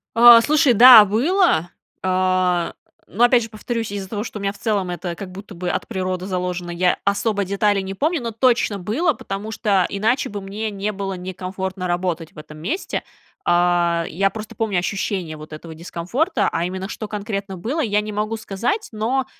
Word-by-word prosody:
А, 235 Hz, 0 st, +9 dB
слушай, 295 Hz, 0 st, +3 dB
да, 235 Hz, -1 st, +10 dB
было, 240 Hz, -, +2 dB, 0.3 s
а, 185 Hz, -2 st, +1 dB, 0.3 s
но 225 Hz, +6 st, 0 dB
опять 245 Hz, 0 st, +5 dB
же 225 Hz, -, -7 dB
повторюсь, 225 Hz, 0 st, -4 dB
из-за 200 Hz, -2 st, -5 dB
того, 210 Hz, +1 st, -4 dB
что 220 Hz, -, -7 dB
у -, -, -7 dB
меня 195 Hz, 0 st, -1 dB
в -, -, -17 dB
целом 200 Hz, -5 st, -1 dB
это 175 Hz, -1 st, -4 dB
как 190 Hz, 0 st, -8 dB
будто 195 Hz, 0 st, -10 dB
бы 180 Hz, +1 st, -3 dB
от -, -, -3 dB
природы 185 Hz, -3 st, -3 dB
заложено, 180 Hz, -1 st, -3 dB
я 180 Hz, +1 st, +1 dB
особо 200 Hz, +1 st, 0 dB
деталей 200 Hz, +1 st, +1 dB
не 190 Hz, 0 st, -6 dB
помню, 310 Hz, -, 0 dB
но 235 Hz, -, -3 dB
точно 230 Hz, -2 st, +1 dB
было, 260 Hz, -, 0 dB
потому 200 Hz, -2 st, -6 dB
что 200 Hz, -5 st, +1 dB
иначе 220 Hz, +6 st, 0 dB
бы 205 Hz, -, -5 dB
мне 205 Hz, +3 st, -4 dB
не 205 Hz, 0 st, -3 dB
было 195 Hz, -1 st, -4 dB
некомфортно 185 Hz, 0 st, -5 dB
работать 175 Hz, -2 st, -2 dB
в -, -, -22 dB
этом 150 Hz, 0 st, -11 dB
месте, 325 Hz, -, -3 dB, 0.4 s
а. 175 Hz, 0 st, +3 dB, 0.3 s
Я 195 Hz, +4 st, +1 dB
просто 215 Hz, +1 st, -8 dB
помню 215 Hz, -5 st, -1 dB
ощущение 185 Hz, -3 st, -3 dB
вот 155 Hz, +1 st, -11 dB
этого 160 Hz, +1 st, -9 dB
дискомфорта, 190 Hz, -, -1 dB
а 165 Hz, -, -1 dB
именно, 190 Hz, +2 st, -5 dB
что 215 Hz, -, -6 dB
конкретно 200 Hz, -2 st, -4 dB
было, 240 Hz, -, -3 dB
я 210 Hz, -5 st, +1 dB
не 210 Hz, 0 st, -6 dB
могу 215 Hz, +2 st, -2 dB
сказать, 230 Hz, -, -2 dB
но, 240 Hz, +5 st, -1 dB
200 Hz, 190 wpm, -21 LUFS, 185-225 Hz, 0.4 s, да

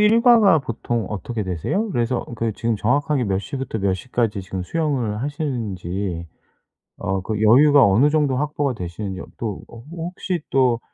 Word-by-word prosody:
일과가 225 Hz, -3 st, +6 dB
보통 120 Hz, -3 st, -3 dB
어떻게 105 Hz, +2 st, -4 dB
되세요? 95 Hz, -, -1 dB
그래서 120 Hz, -3 st, 0 dB
그 115 Hz, 0 st, -1 dB
지금 115 Hz, +2 st, -1 dB
정확하게 140 Hz, +5 st, +1 dB
몇 95 Hz, -3 st, 0 dB
시부터 135 Hz, 0 st, -4 dB
몇 95 Hz, -1 st, +1 dB
시까지 115 Hz, -1 st, -1 dB
지금 95 Hz, 0 st, -5 dB
수영을 125 Hz, -, -1 dB
하시는지 100 Hz, -, -3 dB, 0.7 s
어 95 Hz, -1 st, -1 dB
그 105 Hz, +2 st, -3 dB
여유가 140 Hz, +6 st, +6 dB
어느 110 Hz, +9 st, +4 dB
정도 145 Hz, -4 st, +2 dB
확보가 145 Hz, -1 st, -1 dB
되시는지 95 Hz, 0 st, -5 dB
어 -, -, -8 dB
또 110 Hz, -4 st, -4 dB
어 115 Hz, -, -12 dB
호 165 Hz, +7 st, -7 dB
혹시 180 Hz, -1 st, -3 dB
또 125 Hz, -3 st, +3 dB
120 Hz, 335 characters per minute, -22 LUFS, 100-145 Hz, 0.7 s, 일과가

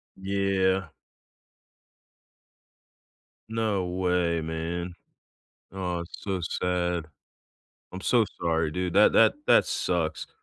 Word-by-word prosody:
Yeah. 95 Hz, -2 st, 0 dB, 2.6 s
No 110 Hz, -4 st, 0 dB
way, 90 Hz, -2 st, 0 dB
man. 85 Hz, +2 st, -4 dB, 0.8 s
Oh, 90 Hz, -2 st, -3 dB
it's 85 Hz, -, -9 dB
so 95 Hz, -2 st, -2 dB
sad. 90 Hz, -1 st, -1 dB, 0.9 s
I'm 95 Hz, +1 st, -7 dB
so 120 Hz, 0 st, +3 dB, 0.2 s
sorry, 80 Hz, -2 st, +1 dB
dude, 90 Hz, +1 st, -2 dB
that 105 Hz, -, +6 dB
that -, -, +6 dB
that -, -, +6 dB
sucks. -, -, -1 dB
90 Hz, 90 wpm, -27 LUFS, 85-95 Hz, 2.6 s, that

